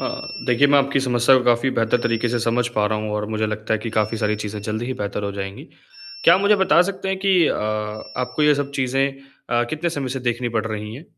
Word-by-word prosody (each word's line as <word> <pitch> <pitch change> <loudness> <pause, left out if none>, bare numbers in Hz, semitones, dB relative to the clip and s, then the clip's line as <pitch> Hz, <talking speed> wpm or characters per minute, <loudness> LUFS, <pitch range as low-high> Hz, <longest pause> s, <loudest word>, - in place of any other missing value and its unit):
अ, - - -3 0.4
देखिए 125 +3 +4
मैं 145 0 +5
आपकी 140 0 +1
समस्या 125 0 +4
को 125 - -4
काफ़ी 120 +2 +3
बेहतर 115 +1 +1
तरीके 115 +1 0
से 120 - 0
समझ 120 +1 +1
पा 105 - +3
रहा 105 +1 -1
हूँ 110 0 -4
और 105 0 -2
मुझे 110 0 0
लगता 110 0 -2
है 110 - -1
कि 115 0 -5
काफ़ी 110 +1 0
सारी 105 -1 0
चीज़ें 105 0 -5
जल्दी 110 +2 -3
ही 130 - -2
बेहतर 105 -1 -4
हो 100 - -3
जाएँगी। 100 0 -6 0.6
क्या - - +8
आप 190 - +2
मुझे 205 +1 +4
बता 190 -3 +4
सकते 190 +1 -4
हैं 190 0 -1
कि 190 -4 +3
अ, - - +1 0.6
आपको 125 +4 -2
ये 150 -1 +5
सब 140 0 -3
चीज़ें 135 +1 +1 0.4
अ, 120 0 +2
कितने 160 +2 -2
समय 140 -5 -3
से 130 +1 -4
देखनी 120 0 -1
पड़ 110 - -2
रही 105 0 -5
है? 145 +8 -10
120 Hz, 250 wpm, -21 LUFS, 110-140 Hz, 0.6 s, क्या